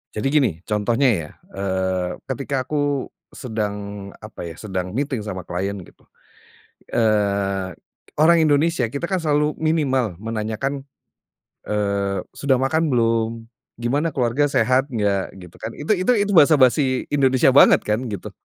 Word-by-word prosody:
Jadi 105 +5 -1
gini 145 -5 +4 0.2
contohnya 115 +5 +1
ya, 75 - -9 0.2
eee, 95 -2 -2
ketika 130 0 -3
aku 145 -1 -1 0.2
sedang 105 -3 -5
apa 110 0 -11
ya, 85 -2 -6
sedang 95 -4 -4
meeting 130 +3 -2
sama 95 -4 -6
klien, 95 +3 -3 1.2
eee, 100 -4 +1 0.5
orang 165 +3 +5
Indonesia, 155 -3 +2
kita 140 - -5
kan 190 - +1
selalu 150 -2 0
minimal 135 - +1
menanyakan, 115 +5 -3 0.8
eee, 100 -2 -1
"Sudah 140 -2 +1
makan 155 +5 +1
belum? 115 -2 0 0.3
Gimana 135 +7 0
keluarga 135 +3 +1
sehat 130 0 +2
nggak?" 100 -7 -1
gitu 90 -3 -13
kan, 110 +1 -6
itu 150 +8 -1
itu 185 +4 +2
itu 205 -1 0
basa-basi 140 -5 +4
Indonesia 130 -2 +4
banget 140 - +7
kan 105 +2 0
gitu, 100 -4 -6
120 Hz, 130 wpm, -21 LUFS, 100-145 Hz, 1.2 s, banget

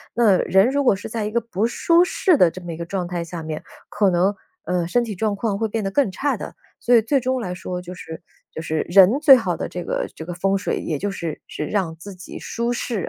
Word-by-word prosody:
那 215 -6 +4
人 195 +5 +4
如 285 +1 +1
果 250 - +4
是 195 - -7
在 220 -1 -3
一 210 - -3
个 235 - +2
不 225 -2 -1
舒 335 +8 +3
适 360 0 +2
的 180 - +5
这 185 - -9
么 175 -1 -6
一 - - -8
个 170 - -4
状 180 0 -3
态 175 -1 -3
下 165 -1 -7
面， 155 -1 -5 0.3
可 205 -2 +2
能， 185 +3 +2 0.3
呃， 175 -2 -1
身 240 +7 +2
体 225 -3 -4
状 210 +2 -1
况 200 -1 -2
会 225 - 0
变 220 0 -3
得 195 - -2
更 215 -3 +2
差 285 +9 -1
的。 - - -8 0.2
所 245 - +1
以 230 - +6
最 270 +6 +1
终 255 +1 -1
来 180 -7 -4
说， 180 0 -5
就 180 +1 -9
是 160 -2 -9 0.3
就 160 - -6
是 160 -1 -2
人 195 +8 +6
最 295 -3 +9
好 190 -9 -1
的 - - -3
这 180 - -6
个 - - -2
这 - - -7
个 175 +1 -6
风 195 +2 +1
水， 195 - -1
也 155 -3 -3
就 205 - -2
是 170 -5 -5
是 150 - -5
让 180 -3 -1
自 195 +5 -10
己 185 0 -10
舒 235 0 -3
适。 230 -4 -3
195 Hz, 285 characters per minute, -22 LUFS, 175-230 Hz, 0.3 s, 最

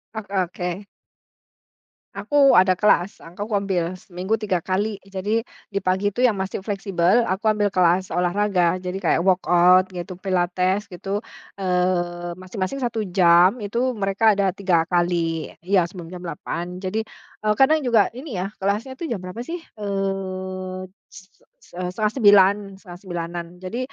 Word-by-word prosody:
Oh, 220 - -4
oke. 185 0 -2 1.3
Aku 285 -2 +4
ada 185 0 +5
kelas. 200 -1 +2
Aku 190 +6 -7
ngambil 190 -4 -1
seminggu 185 +4 -3
3 195 -5 -1
kali 200 +3 -2
jadi 195 +3 -2 0.3
di 200 - +1
pagi 190 +2 0
itu 245 - -2
yang 235 -6 +3
masih 190 0 -3
fleksibel 195 +1 +1
aku 190 +3 0
ambil 205 -2 +1
kelas 180 0 +2
olahraga, 180 0 +1
jadi 180 0 -5
kayak 170 - +2
workout 180 0 +4
gitu, 180 0 -6
pilates 185 +1 0
gitu, 200 +5 -4 0.3
eee, 180 -2 -1
masing-masing 185 +5 -4
1 230 -2 -2
jam, 175 +3 +5
itu 235 +3 -2
mereka 200 +1 +2
ada 195 -2 +1
3 180 -4 +1
kali. 170 -2 0 0.2
Iya 185 -3 +2
sebelum 175 -1 -10
jam 180 - -8
8.00, 175 +1 -5
jadi, 190 +4 -2 0.4
eee, 215 0 +2
kadang 305 +3 +4
juga 230 -5 +3
ini 255 - -7
ya, 195 +3 -3
kelasnya 210 +7 -1
itu 320 +4 -6
jam 230 - -1
berapa 185 +4 -7
sih, 330 +8 -5 0.2
eee, 190 -2 -4 0.2
se 190 - -13
se - - -27
set 180 0 -3
setengah 215 +1 0
sembilan, 200 -5 +6 0.2
8.30-an. 175 -2 -6
Jadi 185 +6 -5
190 Hz, 150 wpm, -22 LUFS, 180-205 Hz, 1.3 s, sembilan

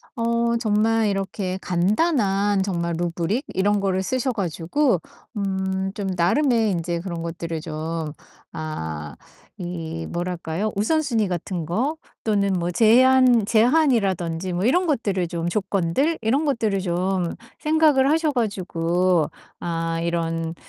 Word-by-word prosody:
어 235 0 +1
정말 220 0 +2
이렇게 195 -1 -2
간단한 200 - +1
정말 170 -3 -2
루브릭 175 - -1
이런 205 +1 +2
거를 190 -1 0
쓰셔 255 +5 0
가지고 190 - 0 0.4
음 190 -1 -1 0.2
좀 200 -2 -3
나름의 225 - +2
인제 170 -1 -2
그런 170 -3 -5
것들을 165 -1 -4
좀 160 -1 -4 0.4
아 80 - -5 0.5
이 165 -2 -5
뭐랄까요? 175 +3 -3
우선순위 235 -1 +1
같은 175 -1 -3
거 250 - -1 0.3
또는 200 -3 +1
뭐 175 -1 -1
제한, 245 +2 +5
제한이라든지 205 - +2
뭐 180 +3 -1
이런 355 +9 +3
것들을 200 - 0
좀 170 0 -3
조건들 200 - 0
이런 265 +8 +1
것들을 220 -8 0
좀 180 0 -1 0.2
생각을 305 -3 +3
하셔 315 0 +2
가지고 180 - 0 0.3
아 165 -1 -2
이런 165 -1 -2
190 Hz, 250 characters per minute, -23 LUFS, 170-230 Hz, 0.5 s, 제한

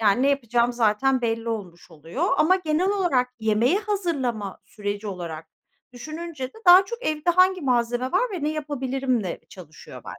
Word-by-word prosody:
Ya 210 -2 +4
ne 260 +7 +2
yapacağım 240 -3 +1
zaten 240 +3 +2
belli 230 0 -1
olmuş 185 -7 -6
oluyor 165 - -4
ama 370 +2 +4
genel 340 +1 0
olarak 345 -11 +1
yemeği 220 - +2
hazırlama 290 - -2
süreci 205 0 -5
olarak 170 -5 -6 0.5
düşününce 310 +1 -6
de 445 - -17
daha 365 +2 +9
çok 470 +5 -7
evde 310 +3 +1
hangi 370 +1 +4
malzeme 245 0 0
var 370 - +3
ve 350 -6 -5
ne 300 - +1
yapabilirimle 270 - -2
çalışıyor 165 -5 -13
bende. - - -9
255 Hz, 160 wpm, -24 LUFS, 220-330 Hz, 0.5 s, daha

